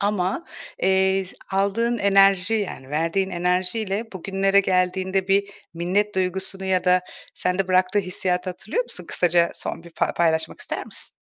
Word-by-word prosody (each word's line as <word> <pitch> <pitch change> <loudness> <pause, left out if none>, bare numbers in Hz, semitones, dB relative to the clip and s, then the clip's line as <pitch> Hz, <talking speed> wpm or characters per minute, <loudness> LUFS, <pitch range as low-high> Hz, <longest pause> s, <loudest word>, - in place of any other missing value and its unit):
Ama, 200 - -1 0.4
eee, 190 0 +3
z 180 - -12 0.2
aldığın 220 +5 +1
enerji 195 +1 +4
yani 180 -11 -3
verdiğin 165 +5 0
enerjiyle 185 +4 -1
bugünlere 195 +2 +2
geldiğinde 190 0 0
bir 200 +1 +3 0.3
minnet 195 +5 0
duygusunu 190 +1 -2
ya 185 -1 +1
da 180 0 +4 0.3
sende 180 +1 -1
bıraktığı 185 +2 +3
hissiyatı 180 -1 -1
hatırlıyor 410 - -2
musun? - - -7
Kısaca 170 -1 +3
son - - -3
bir 170 -1 -14
fa - - 0
paylaşmak 160 -1 0
ister - - -4
misin? - - -8
190 Hz, 145 wpm, -23 LUFS, 180-195 Hz, 0.4 s, enerji